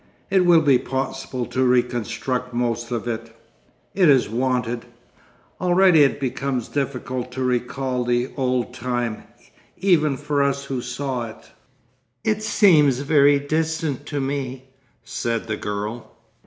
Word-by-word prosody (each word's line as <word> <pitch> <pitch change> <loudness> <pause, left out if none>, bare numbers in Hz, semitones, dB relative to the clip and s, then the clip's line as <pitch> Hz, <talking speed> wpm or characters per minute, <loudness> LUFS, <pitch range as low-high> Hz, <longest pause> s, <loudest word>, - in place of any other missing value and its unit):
It 185 -2 +4
will 170 -2 +7
be 135 -4 +5
possible 130 -1 -3
to 130 - -1
reconstruct 125 0 0
most 120 -1 -1
of 120 -1 -3
it.... 115 -1 -5 0.6
It 180 -4 +4
is 135 -3 +5
wanted. 120 0 -1 0.8
Already 180 -2 +5
it 140 0 +3
becomes 135 -2 -2
difficult 130 -2 -3
to 130 - -3
recall 125 +1 -1
the 120 +1 0
old 125 -3 -1
time—even 130 - -2
for 145 0 -1
us 140 0 0
who 135 -2 -3
saw 125 -1 -3
it.' 110 - -15 0.7
'It 215 -1 0
seems 155 - +4
very 145 -1 +5
distant 155 -1 -2
to 145 - -3
me,' 135 -1 -3 0.4
said 115 -1 -3
the 110 -1 -2
girl. 105 +3 -5
130 Hz, 130 wpm, -22 LUFS, 120-145 Hz, 0.8 s, will